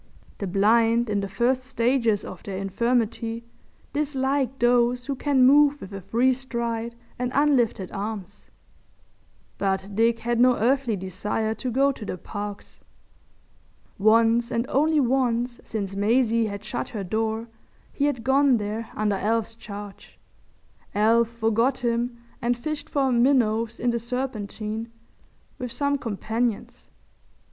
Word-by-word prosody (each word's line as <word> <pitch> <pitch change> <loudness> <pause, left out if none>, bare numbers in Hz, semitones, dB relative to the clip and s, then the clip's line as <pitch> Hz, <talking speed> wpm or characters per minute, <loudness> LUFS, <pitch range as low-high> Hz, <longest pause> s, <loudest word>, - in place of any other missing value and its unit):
The 200 - -3
blind 225 +4 +3
in 205 - +1
the 195 - -2
first 240 +6 0
stages 235 -4 +1
of 185 - -9
their 195 -2 -6
infirmity 230 +3 -1 0.5
dislike 275 -2 0
those 245 0 +2
who 280 - -2
can 270 -1 +3
move 290 +2 +5
with 195 -4 -10
a 195 - -6
free 245 +7 +2
stride 235 -3 -3 0.2
and 250 0 -1
unlifted 255 -9 +2
arms—but 200 -1 -7
Dick 230 +2 +3
had 235 0 -1
no 250 0 +5
earthly 250 0 +1
desire 200 +4 -2
to 255 +3 -4
go 270 +3 +3
to 250 - -9
the 190 - -4
Parks. 205 +2 -7 1.2
Once 225 +3 +4
and 230 +1 0
only 305 +3 +3
once 245 -2 +1
since 200 -3 -4
Maisie 230 +2 +2
had 200 0 -6
shut 215 - -4
her 210 -3 -4
door 220 +4 -2 0.5
he 285 - 0
had 280 -6 -1
gone 265 0 +4
there 215 +2 -4
under 210 -2 0
Alf's 225 +2 0
charge. 205 -3 -10 0.8
Alf 225 +2 +4
forgot 235 +3 0
him 235 +1 0 0.2
and 240 0 +1
fished 305 +4 -5
for 270 -2 +1
minnows 235 -3 +2
in 245 0 +1
the 235 - -1
Serpentine 225 -2 -4 0.7
with 250 -1 -4
some 285 +1 0
companions. 225 0 -3
230 Hz, 135 wpm, -25 LUFS, 215-255 Hz, 1.2 s, move